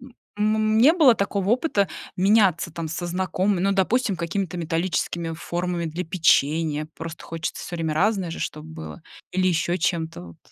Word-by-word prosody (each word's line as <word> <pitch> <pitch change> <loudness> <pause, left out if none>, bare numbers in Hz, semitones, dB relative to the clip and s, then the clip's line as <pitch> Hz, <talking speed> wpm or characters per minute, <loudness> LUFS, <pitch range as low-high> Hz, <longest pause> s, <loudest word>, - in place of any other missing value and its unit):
м 250 0 -14 0.4
м, 215 0 +2
не 280 +8 +7
было 290 -9 +6
такого 200 -1 -1
опыта 235 - +2 0.3
меняться, 190 -4 +3
там, 165 -1 -4
со 170 +2 -4
знакомыми, 185 +1 0
ну, 195 +1 +2
допустим, 195 +1 +1
какими-то 175 +1 -3
металлическими 170 0 -2
формами 175 +1 -3
для 165 +3 -3
печенья? 155 -3 +2
Просто 165 0 -7
хочется 165 -1 -5
всё 175 - -6
время 160 -2 -1
разное 190 -1 +1
же - - -6
чтоб 155 0 -4
было, 160 +1 -9 0.3
или 185 0 +1
ещё 175 0 +1
чем-то 165 - -2
вот. 85 -2 -13
175 Hz, 165 wpm, -24 LUFS, 165-200 Hz, 0.4 s, не